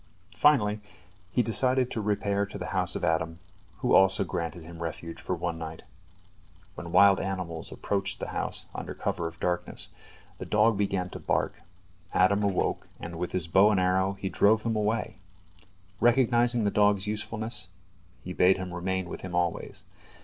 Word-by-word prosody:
Finally, 105 -8 +3 0.5
he 120 +6 +1
decided 125 +3 +2
to 110 - -2
repair 100 -1 0
to 100 - -6
the - - -5
house - - +1
of - - -4
Adam, 80 0 0 0.4
who - - +1
also 95 0 +5
granted 85 0 -4
him 85 +1 -11
refuge 85 0 -6
for 90 - -2
one 85 -1 -3
night. 80 0 -7 0.9
When 85 - -8
wild 100 +2 +6
animals 90 -4 -3
approached 100 0 -2
the - - -4
house - - -1
under - - -6
cover 85 -1 -2
of 85 +1 -10
darkness, 90 0 -1 0.5
the - - -5
dog 105 +1 +3
began 95 -3 -1
to - - -7
bark, - - -1 0.5
Adam 100 +3 +4
awoke, 100 -3 0
and 85 +1 -7
with 90 - -3
his 90 -3 0
bow 95 +5 +5
and 105 -3 +2
arrow 95 +1 +2
he 95 0 -5
drove 110 +3 +3
them 115 -1 -1
away. 105 -2 -1 0.8
Recognizing 120 -1 +3
the 100 - +1
dog's 105 -2 +3
usefulness, 110 -1 -2 0.5
he 90 - -6
bade 90 +1 +4
him 95 -2 -6
remain 95 +1 -2
with - - -7
him 90 -2 -6
always. 85 -1 -2
95 Hz, 165 wpm, -28 LUFS, 90-105 Hz, 0.9 s, wild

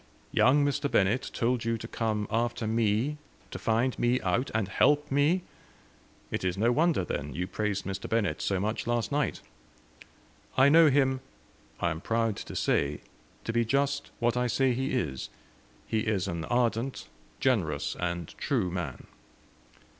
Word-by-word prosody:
"Young 145 +3 +4
Mr. 140 0 0
Bennett 105 +5 +2
told 120 0 0
you 115 0 0
to 115 - -7
come 110 -3 -1
after 115 0 0
me, 115 +6 +1 0.3
to - - -6
find 115 +3 +1
me 120 +1 +2
out, 115 +8 0
and 110 -3 0
help 145 +8 +2
me! 150 +6 +3 0.9
It - - -2
is 90 0 -1
no 115 +4 +3
wonder, 155 - +2
then, 75 -3 -4
you 90 - -1
praised 100 +1 -2
Mr. 95 0 -4
Bennett 100 -9 0
so 95 -2 0
much 105 +4 -2
last 120 +1 0
night." 145 0 0 1.2
"I 135 +2 +7
know 160 +1 +7
him 130 -1 +2 0.6
I 85 - +1
am 80 +1 -5
proud 115 0 0
to - - -7
say 70 +1 0 0.4
to 115 - -3
be 120 0 +3
just 140 +4 0
what 120 +1 +1
I 125 0 +1
say 130 +2 +2
he 130 +3 -2
is. 70 - -2 0.6
He 110 - 0
is 105 -3 0
an 85 -3 -3
ardent, 120 +1 0 0.3
generous, 80 - 0
and 85 -2 -2
true 130 - 0
man." 85 -7 -5
115 Hz, 160 wpm, -29 LUFS, 100-130 Hz, 1.2 s, I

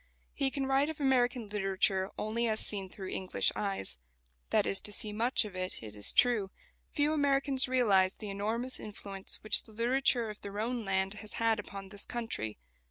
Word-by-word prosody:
He 275 -1 +1
can 270 0 -2
write 270 +2 +2
of 315 - -6
American 250 -4 +2
literature 195 -1 0
only 230 +2 -1
as 220 -1 0
seen 195 -3 -1
through 190 0 -7
English 185 -1 0
eyes. 195 - -3 0.5
That - - +3
is 100 - +3
to 210 - -2
see 210 0 +2
much 235 +2 +2
of 200 -3 -8
it, 185 -8 -3
it 105 -1 -7
is 105 -1 +5
true. 230 -6 +3 0.4
Few 295 +1 +1
Americans 275 -2 +2
realise 205 -7 +3
the 210 -2 -6
enormous 225 +6 -2
influence 200 -2 -5
which 215 - +4
the 220 - -18
literature 240 +1 +2
of 210 - -13
their 200 +1 -6
own 235 +1 -1
land 190 0 +1
has 210 +1 -8
had 225 -1 +2
upon 195 -1 -7
this 200 0 -2
country. 225 - -4
215 Hz, 185 wpm, -32 LUFS, 195-245 Hz, 0.5 s, is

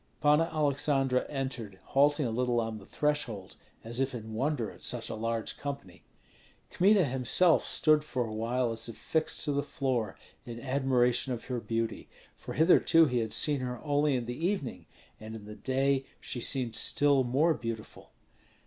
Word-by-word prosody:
Panna 150 +3 +3
Aleksandra 140 -3 +1
entered, 130 -8 -5
halting 145 +1 +3
a 115 - -1
little 120 +1 0
on 110 -1 -3
the 95 - -15
threshold, 145 -10 -2 0.3
as 115 +2 -4
if 135 -1 -1
in 110 -1 -7
wonder 130 -1 -1
at - - -16
such 120 -2 -1
a - - -4
large 115 0 -3
company. 140 -11 -7 0.7
Kmita 195 0 +4
himself 135 +6 +4
stood 155 -1 +3
for 130 -5 -2
a 110 - -6
while 120 +2 -1
as 115 +1 -2
if 115 - -9
fixed 160 -1 -1
to 150 - 0
the 140 0 0
floor 125 -8 -2 0.3
in 120 -1 -8
admiration 130 -1 +1
of 120 - -6
her 125 -2 -3
beauty; 115 0 -3 0.3
for - - -8
hitherto 165 0 +5
he 125 -4 0
had 110 -2 -2
seen 145 -3 +3
her 125 -1 -4
only 145 -1 +1
in 120 -2 -2
the 120 - -4
evening, 190 -11 -4 0.3
and 110 +1 -8
in 105 -2 -10
the 105 - -9
day 135 +5 0
she 120 - -5
seemed 125 -3 0
still 140 +1 +3
more 140 +7 +2
beautiful. 115 -5 -7
130 Hz, 175 wpm, -30 LUFS, 115-145 Hz, 0.7 s, hitherto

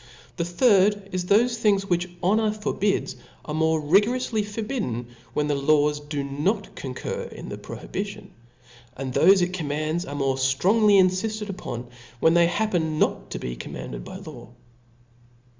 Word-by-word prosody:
The 170 - 0
third 200 +1 +3
is, 180 -1 -2
that 200 +3 +6
thofe 240 0 0
things 205 -3 +2
which 175 -1 0
honor 215 +4 +3
for 215 0 -3
bids, 200 -1 0 0.3
are 150 - -5
more 160 0 +2
rigoroufly 210 - +2
forbidden, 205 - -4 0.3
when 150 - +1
the 150 - +1
laws 150 +1 +2
do 145 -1 -4
not 155 +10 -1
concur 130 -2 -5
in - - -9
the - - -5
prohibition; - - -6 0.7
and 130 -1 -4
thofe 190 +5 +6
it 180 +1 -2
com* 170 -5 -3
mands, 155 +4 -1
are 145 - -5
more 135 -2 0
ftrongly 195 +11 +4
in 185 -1 +6
fitted 210 +3 -3
upon, 120 -10 -6 0.3
when 160 - +4
they 170 0 +5
happen 175 -6 0
not - - 0
to - - -4
be - - -5
commanded - - -7
by - - -9
law. - - -10
175 Hz, 165 wpm, -25 LUFS, 145-205 Hz, 0.7 s, that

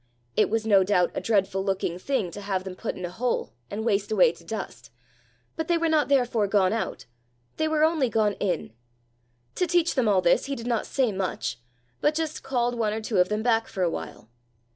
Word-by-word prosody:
It - - +3
was 225 +1 0
no 200 -3 +5
doubt 180 -2 +2
a - - -3
dreadful 195 -3 +1
looking 190 -3 -1
thing 225 -5 -1
to 205 - -8
have 195 -2 -2
them 190 -1 -6
put - - -4
in 185 - -5
a 175 - -6
hole, 235 - -2 0.2
and 220 +2 -4
waste 205 -2 0
away 465 - +5
to - - -17
dust, - - -6 0.7
but 320 -1 -3
they 345 - +3
were 335 0 +1
not 310 -2 +3
therefore 245 -6 +2
gone 195 -1 +3
out 225 - -3 0.5
they 315 - +1
were 310 -1 +2
only 315 -5 +3
gone 215 -2 +2
in! 180 - -2 0.8
To 360 - 0
teach 345 0 +2
them 255 -5 +1
all 195 -3 +4
this 170 - +3
he 275 0 -3
did 235 - -7
not 235 -2 -1
say 260 -5 +1
much, 190 - -3 0.4
but 300 +1 +2
just 320 -1 -2
called 245 -2 0
one 220 -3 0
or 220 - -2
two 215 -3 0
of 180 - +4
them 210 +1 -1
back 225 -1 +2
for 190 -4 -3
a 170 - +2
while. 115 - -7
220 Hz, 220 wpm, -26 LUFS, 195-270 Hz, 0.8 s, no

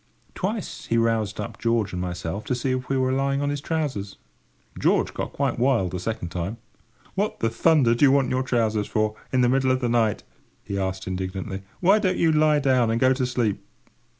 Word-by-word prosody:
Twice 190 - -4
he 115 - +1
routed 115 -3 0
up 105 - -6
George 115 -4 0
and 90 - -3
myself 90 +2 -4
to 125 - -1
see 125 +2 -1
if 130 0 -3
we 135 - +1
were 130 0 +1
lying 135 +1 0
on 145 0 0
his 145 -1 -3
trousers. 140 -11 -3 0.6
George - - +2
got - - -4
quite 140 -4 -1
wild 120 -8 +2
the 90 - -3
second 95 -3 -4
time. 90 +5 -4 0.6
"What 205 +2 -1
the 115 - 0
thunder 140 -2 +4
do 120 +5 +4
you 135 - +6
want 135 -2 +2
your 130 - +1
trousers 110 -5 0
for, 110 0 0 0.2
in 130 - +2
the 125 - +4
middle 130 0 +2
of 130 0 +2
the 125 -2 -1
night?" 115 -3 +1 0.4
he 100 0 -3
asked 95 0 -3
indignantly. 95 +1 -4 0.2
"Why 195 +4 +5
don't 185 -3 0
you 165 - +3
lie 155 -1 +4
down, 130 -5 +2
and 115 +1 +1
go 130 +1 +4
to 130 -1 -1
sleep?" 110 -5 -1
120 Hz, 210 wpm, -24 LUFS, 105-135 Hz, 0.6 s, you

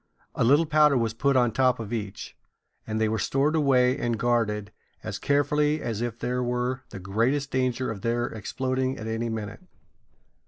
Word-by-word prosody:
A - - 0
little 145 +7 +5
powder 150 -2 +4
was 115 -2 0
put 140 +4 +1
on 120 -2 +3
top 125 +1 +2
of 115 0 -5
each, 105 -3 -5 0.5
and 110 0 -2
they 110 - +2
were 110 0 -1
stored 140 +7 +1
away 130 -4 +3
and 120 -4 -1
guarded 105 -3 0 0.3
as - - -5
carefully 150 +1 +1
as 115 -5 -3
if 120 -1 -3
there 125 +1 -2
were 125 +1 -1
the - - -8
greatest 115 +9 0
danger 130 -1 0
of 100 -3 -7
their 120 +2 0
exploding 130 +4 -2
at 110 - -7
any 115 +1 -2
minute. 105 - -5
120 Hz, 180 wpm, -26 LUFS, 110-135 Hz, 0.5 s, little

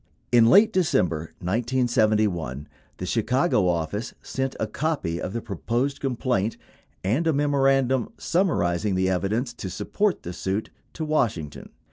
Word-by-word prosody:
In 120 -2 +6
late 210 - +6
December 85 - 0
1971, 110 - +1 0.3
the 90 - -4
Chicago 120 - +1
office 85 - -2
sent 135 0 -3
a - - +1
copy 105 - -2
of 90 - -3
the 115 +2 -4
proposed 120 - -2
complaint 125 -5 -1 0.5
and 125 - +1
a 160 - +3
memorandum 135 -3 +2
summarizing 105 - +1
the 95 0 +1
evidence 110 +7 -1
to 100 -5 -6
support 205 - -1
the 90 - -5
suit 95 +4 -3 0.2
to 160 - -4
Washington. 105 - -1
115 Hz, 130 wpm, -25 LUFS, 95-135 Hz, 0.5 s, In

